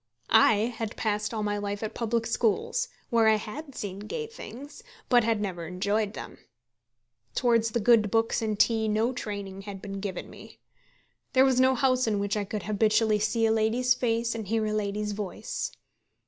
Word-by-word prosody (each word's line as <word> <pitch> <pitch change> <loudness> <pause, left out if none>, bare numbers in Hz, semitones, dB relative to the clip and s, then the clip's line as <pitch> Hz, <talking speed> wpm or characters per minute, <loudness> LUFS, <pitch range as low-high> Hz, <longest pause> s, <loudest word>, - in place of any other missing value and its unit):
I 220 +1 +5
had 225 -2 -4
passed 210 -1 -1
all 220 -2 -2
my 205 0 -1
life 205 +1 -4
at 215 - -4
public 230 0 -1
schools, 230 - 0 0.2
where 230 -2 +4
I 220 - +6
had 270 +7 -7
seen 195 -2 -5
gay 455 - -4
things, 285 - -10 0.3
but 245 -2 +5
had 225 -1 +1
never 180 -5 -4
enjoyed 200 +4 -1
them. - - -8 1.0
Towards 230 -3 +3
the 235 - -1
good 220 -1 +4
books 225 +2 +1
and 215 -2 -2
tea 225 -1 +3
no 220 +4 +1
training 200 -4 -5
had 200 -1 -8
been 195 0 -6
given 195 -2 -5
me. - - -13 0.8
There 260 0 +6
was 260 -2 +3
no 260 0 +5
house 255 -1 +2
in 210 -2 +1
which 200 +1 -1
I 205 -1 -1
could 205 0 -4
habitually 215 +1 +2
see 225 +2 +1
a 220 - +3
lady's 225 +3 +2
face 230 -1 0
and 220 -3 -5
hear 220 +1 0
a 215 - -1
lady's 210 0 -1
voice. 210 - -4
220 Hz, 185 wpm, -27 LUFS, 205-235 Hz, 1.0 s, I